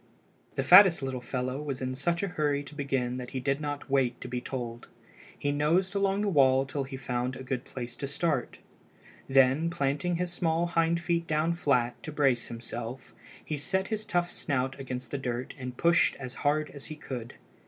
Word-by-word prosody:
The 135 - 0
fattest 180 +1 +8
little 130 -2 -3
fellow 130 +2 -3
was 140 -3 -3
in 130 0 -2
such 170 +7 0
a 200 - 0
hurry 145 -4 0
to 145 - -11
begin 135 -4 -1
that 125 -1 -6
he - - 0
did 135 +3 0
not 145 -1 -4
wait 130 -3 +1
to - - -6
be 125 0 -3
told. 120 -3 -5 0.5
He 145 - 0
nosed 165 +6 +2
along 200 0 +1
the 210 - 0
wall 135 -5 +4
till 140 0 -3
he 135 0 -7
found 125 -1 -2
a 130 - -7
good 130 -1 -3
place 120 -2 -6
to 140 - -3
start. 155 +4 -1 0.7
Then 135 +4 +4
planting 145 +3 0
his 175 0 -2
small 165 -1 +1
hind 170 0 +2
feet 170 0 0
down 155 +2 +1
flat, 125 -8 +1
to 155 - -6
brace 135 -5 +2
himself, 120 +1 -7 0.3
he 155 - -2
set 190 +6 -1
his 215 -1 -1
tough 175 -4 0
snout 135 -2 -1
against 130 -1 -5
the 140 - -2
dirt 125 -1 -3
and 125 -1 -6
pushed 170 0 +4
as 130 -2 -7
hard 150 +1 +1
as 140 -1 -9
he 155 - -7
could. 125 -6 -7
140 Hz, 195 wpm, -29 LUFS, 130-165 Hz, 0.7 s, fattest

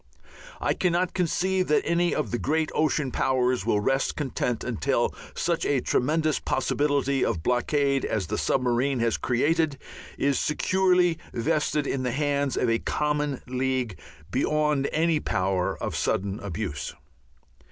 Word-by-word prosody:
I - - +1
cannot 180 0 0
conceive 185 +1 0
that 150 - +2
any 175 0 +1
of 150 - -2
the 120 - -1
great 155 +2 0
ocean 150 -3 +1
powers 125 -5 +1
will 105 - +3
rest 135 +5 0
content 125 -4 -2
until 125 0 0 0.2
such 170 -1 0
a 140 - +2
tremendous 155 +5 +1
possibility 140 0 0
of 80 - -1
blockade 140 - +1
as 105 -4 -1
the - - -3
submarine 130 +1 +1
has 115 -1 +1
created 145 +4 +1 0.4
is 140 -1 +1
securely 180 +1 +2
vested 150 +5 0
in 135 -1 -1
the 125 -2 -1
hands 140 -1 0
of 125 - +1
a 115 0 +2
common 150 -2 -1
league 130 -4 -1 0.4
beyond 150 +1 +1
any 160 0 +2
power 95 -6 -1
of - - -4
sudden 100 +1 -1
abuse. 100 -5 -4
140 Hz, 140 wpm, -26 LUFS, 125-155 Hz, 0.4 s, will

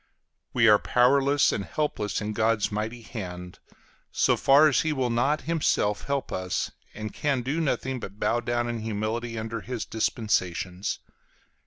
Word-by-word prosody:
We 115 -2 +4
are 105 -1 +7
powerless 140 +3 +3
and 100 - -2
helpless 110 -7 -2
in 105 +1 -3
God's 110 -1 +1
mighty 110 +3 -3
hand, 90 -6 -7 0.5
so - - +3
far 145 +3 +6
as 145 - +3
he 160 - 0
will 130 -4 0
not 135 +6 +1
himself 150 -10 0
help 140 -1 -2
us, 95 0 -2 0.2
and 110 0 -6
can 140 -4 0
do 145 +6 -1
nothing 130 -3 -1
but 100 -2 -9
bow 120 - +1
down 120 0 -1
in 120 -1 -3
humility 110 +2 -3
under 110 0 -4
his 125 0 -4
dispensations. 95 -4 -1
115 Hz, 155 wpm, -26 LUFS, 105-130 Hz, 0.5 s, are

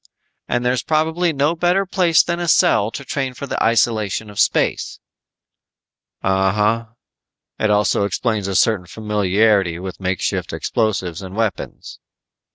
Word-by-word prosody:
And 120 0 -1
there's 125 0 +1
probably 160 +3 +1
no 145 +2 +1
better 175 +4 +1
place 180 -4 +3
than 170 0 -2
a 175 - -2
cell 105 -8 +3
to 140 +4 -8
train 130 -2 -3
for 140 - -6
the - - -2
isolation 110 -2 +1
of 100 - -8
space." - - +1 1.3
"Uh 95 0 +2
huh. 105 +2 +1 0.7
It 110 - +1
also 105 -1 +2
explains 105 -1 -1
a 100 - -3
certain 95 -2 +2
familiarity 105 -2 +1
with 95 +1 -7
makeshift 95 -1 -2
explosives 95 -7 -1
and 95 0 -8
weapons." 110 -4 -4
110 Hz, 140 wpm, -19 LUFS, 100-140 Hz, 1.3 s, place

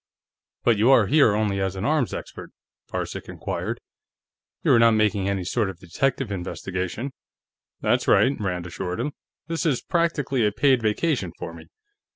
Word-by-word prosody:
"But 115 -3 +3
you 115 +4 +4
are 125 -5 +6
here 140 -3 +4
only 105 -2 0
as 95 0 -1
an 95 - -3
arms 150 -4 +1
expert?" - - -7 0.4
Varcek - - -4
inquired. - - -4 0.8
"You - - +3
are - - +6
not 115 -1 +6
making 105 -2 +2
any 100 -2 -1
sort 105 +3 0
of 95 - -8
detective 120 +7 -1
investigation?" 95 +6 -4 0.7
"That's - - +1
right," 135 +2 +4
Rand 90 -4 -2
assured 90 +2 -4
him. 140 +5 -1 0.3
"This 165 +1 -2
is 150 -7 +1
practically 155 -7 0
a 105 - +3
paid 130 -1 +3
vacation, 110 - 0
for 85 - -6
me. 85 - -12
110 Hz, 165 wpm, -24 LUFS, 95-135 Hz, 0.8 s, are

